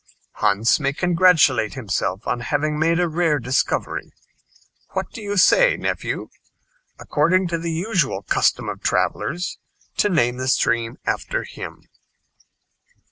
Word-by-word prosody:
Hans 105 +5 +2
may 140 -2 0
congratulate 165 - +3
himself 100 -5 -2
on 125 - -1
having 150 +4 -1
made 165 +2 +2
a 175 - +2
rare 165 -2 +1
discovery. 130 +1 -1 0.8
What - - -3
do 230 - -9
you 205 -1 -3
say, - - +5
nephew, - - -3 0.7
according 180 +5 +1
to 170 -1 -1
the 165 0 -3
usual 175 -2 -1
custom - - +1
of - - -5
travelers, 175 +5 -1 0.4
to 205 - +3
name 120 -9 +1
the 130 0 -3
stream 115 -3 +1
after - - -2
him?" - - -9
155 Hz, 130 wpm, -21 LUFS, 125-175 Hz, 0.8 s, say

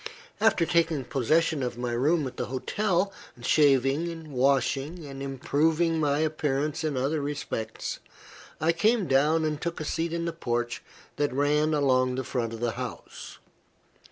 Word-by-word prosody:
After 220 -6 +3
taking 165 -4 +1
possession 155 +5 +1
of 125 -2 -3
my 120 0 -2
room 145 +6 +2
at 130 - -6
the - - -2
hotel; 190 - 0 0.3
shaving, 150 +4 +2
washing, 140 +5 +1
and 135 -1 -8
improving 155 +5 +1
my 145 -2 +2
appearance 150 -1 -1
in 150 -4 -1
other 145 +4 0
respects, 140 -6 -4 0.6
I 160 +2 +3
came 210 +5 +2
down 150 +3 +3
and 155 0 -2
took 170 -1 -3
a 155 - -4
seat 165 +2 -1
in 170 0 -2
the 170 - -2
porch 120 -6 -2 0.4
that 145 0 +1
ran 150 +3 +2
along 130 -3 +2
the 130 - -2
front 120 -2 -2
of 115 0 -7
the 120 -1 +1
house. 125 -1 -7
145 Hz, 155 wpm, -27 LUFS, 130-165 Hz, 0.6 s, After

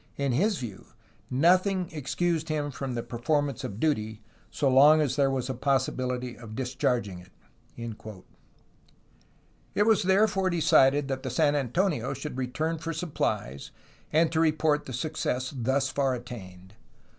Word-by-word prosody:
In 140 -1 0
his 195 - +1
view 110 -7 -8 0.4
noth 175 +9 +4
ing 190 -3 -1
excused 160 +2 -1
him 150 -2 -1
from 135 -1 -5
the 115 - -3
performance 140 +2 -1
of 115 -5 -5
duty, 110 -8 -1 0.3
so 140 - -1
long 145 +4 +7
as 140 -4 +1
there 140 -1 +3
was 130 -2 -2
possibility 125 -2 -1
of 110 -2 -10
discharging 125 -6 -1
it." 90 +2 -16 2.4
It 205 - +3
was 220 -2 +4
therefore 195 0 +2
decided 145 -4 +4
that 135 -1 -3
the 130 - -4
San 145 +3 +2
Antonio 140 - 0
should 140 0 -6
return 155 +6 -2
for 165 +2 -4
supplies 150 - -3 0.4
and 160 +1 +3
to 160 - 0
report 155 -2 +2
the 130 - -6
success 130 -1 -2
thus 135 +2 0
far 135 -1 0
attained. 95 -6 -10
140 Hz, 145 wpm, -27 LUFS, 125-160 Hz, 2.4 s, long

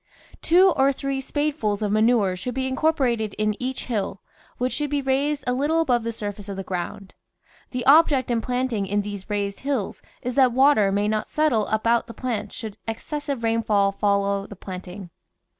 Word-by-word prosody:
Two 365 +3 +5
or 275 -2 +3
three 275 0 -3
spadefuls 270 -8 -1
of 205 - 0
manure 215 -3 +3
should 245 +7 -5
be 265 0 -1
incorporated 260 -7 0
in 215 0 0
each 260 +1 -3
hill, 200 -5 -2 0.4
which 250 +1 -1
should 295 -1 -1
be 290 0 0
raised 280 +2 0
a 250 - +1
little 295 +5 +1
above 250 -7 +2
the 230 - -2
surface 205 -2 -6
of 200 - -4
the 195 - -4
ground. 185 +1 -5 0.6
The 250 -2 -4
object 280 -3 +5
in 230 -1 +1
planting 245 -5 -1
in 205 +1 0
these 200 -1 -7
raised 200 -1 -2
hills 270 -8 -2 0.2
is 250 - -2
that 255 -2 +4
water 260 -6 +4
may 205 +1 +1
not 215 0 -1
settle 280 -9 +1
about 230 +2 +1
the 230 - -10
plants 215 -5 -3
should 220 -2 -6
excessive 280 +3 -4
rainfall 220 -3 +2
follow 200 0 0
the 205 - -10
planting. 185 0 -8
230 Hz, 180 wpm, -24 LUFS, 205-270 Hz, 0.6 s, Two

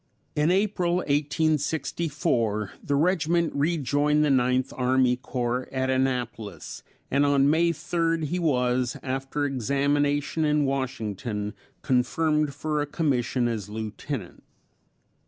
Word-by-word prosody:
In 150 +2 +2
April, 185 -2 +1
1864, 145 - 0
the 145 - 0
regiment 170 +1 +2
rejoined 150 0 +2
the 145 - +2
Ninth 130 0 +2
Army 130 0 +3
Corps 125 0 -3
at 130 0 0
Annapolis, 125 -6 -2 0.3
and 140 +2 +3
on 140 -1 +4
May 170 +2 +3
3rd 165 0 -1
he 175 +4 -1
was, 125 -6 +1
after 135 +2 -2
examination 145 +3 0
in 150 -1 +2
Washington, 110 -6 -3 0.3
confirmed 150 +3 +1
for 150 0 -1
a 145 - -2
commission 130 -5 0
as 110 -4 -3
Lieutenant. 110 - -6
140 Hz, 110 wpm, -26 LUFS, 125-155 Hz, 0.3 s, on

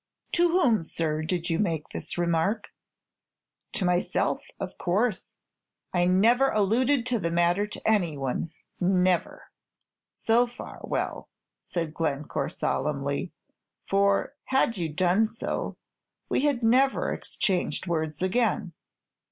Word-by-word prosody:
"To 345 0 +3
whom, 255 - +3
sir, 155 -1 -2
did 170 +1 -2
you 165 - +1
make 165 -7 -1
this - - -3
remark?" 175 +5 0 1.0
"To 190 - -1
myself, 180 0 +1 0.2
of - - -5
course. 205 +4 0 0.6
I 175 -1 +3
never 230 +9 +4
alluded 240 +5 +2
to 245 -2 0
the 170 - -1
matter 175 +4 +2
to 210 - -7
any 180 -9 +2
other; 135 +4 -2 0.3
never." 185 -1 +1 0.6
"So 235 +2 +2
far, 240 - -10
well," - - -3 0.3
said 165 -3 -3
Glencore, 150 -3 -2
solemnly; 140 +3 -2 0.6
"for 200 +5 +2
had 265 -3 +2
you 170 -4 -2
done 185 +7 +2
so, 225 - -4 0.5
we 285 - +1
had 270 -5 +1
never 260 +4 +3
exchanged 190 -4 -1
words 160 -1 -2
again!" 190 -3 +1
185 Hz, 120 wpm, -27 LUFS, 165-230 Hz, 1.0 s, never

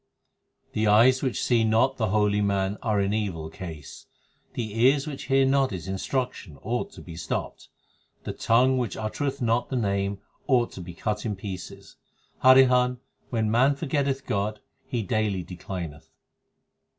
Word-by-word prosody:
14 - - -38
The - - +3
eyes 120 +5 +5
which 130 -3 -1
see 120 -2 +3
not 115 +5 +2
the 110 - 0
holy 105 0 +2
man 100 0 0
are 110 -3 +1
in 100 +1 +1
evil 90 -7 -3
case; 80 -6 -9 0.5
The 110 -2 -4
ears 135 +3 +4
which 145 -3 -6
hear 135 0 +3
not 135 0 +3
his 95 -3 -6
instruction 95 - -3
ought 120 - -2
to - - -11
be 85 - -9
stopped; 80 - -4 0.5
The - - -4
tongue 130 +3 +3
which 120 -5 -3
uttereth 135 +5 -3
not 115 +1 +1
the 130 - -3
Name 100 -3 0 0.3
ought 125 -4 +3
to 95 - -8
be 90 -1 -9
cut 105 +3 -2
in 105 -3 -2
pieces 95 -2 -8 0.5
Harihan, 125 -1 +6 0.3
when 110 -3 0
man 130 +5 +4
forgetteth 140 -2 -1
God, 105 +2 -1 0.3
he 120 -4 -2
daily 105 -2 0
declineth. 85 -4 -7
110 Hz, 160 wpm, -26 LUFS, 100-130 Hz, 0.5 s, Harihan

